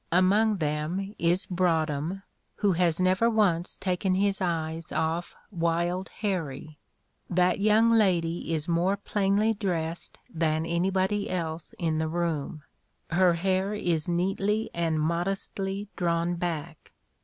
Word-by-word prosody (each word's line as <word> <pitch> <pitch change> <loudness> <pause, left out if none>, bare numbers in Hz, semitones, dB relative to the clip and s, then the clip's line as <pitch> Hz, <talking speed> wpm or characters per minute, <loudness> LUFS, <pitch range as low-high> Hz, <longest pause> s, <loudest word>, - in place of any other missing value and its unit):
Among 200 +5 +4
them 160 +5 -2
is 175 +3 +2
Broadhem, 170 0 0 0.3
who 205 -2 +2
has 175 -2 +2
never 185 +5 +3
once 195 -7 +1
taken 185 0 0
his 200 +1 +1
eyes 165 -2 -2
off 165 +2 -1 0.2
Wild 175 +1 -1
Harrie. 155 -7 -3 0.5
That 180 0 +2
young 215 +3 +4
lady 175 -7 +2
is 160 0 0
more 175 +4 +1
plainly 205 +2 +1
dressed 175 -5 -3
than 160 -1 0
anybody 190 +4 0
else 165 -3 -4
in 160 -2 0
the 160 - 0
room. 160 -3 -2 0.5
Her 175 +1 +4
hair 190 +3 0
is 170 -6 -1
neatly 195 +5 0
and 165 -2 0
modestly 195 +4 -2
drawn 170 0 0
back. 170 -2 -5
175 Hz, 120 wpm, -27 LUFS, 165-195 Hz, 0.5 s, Among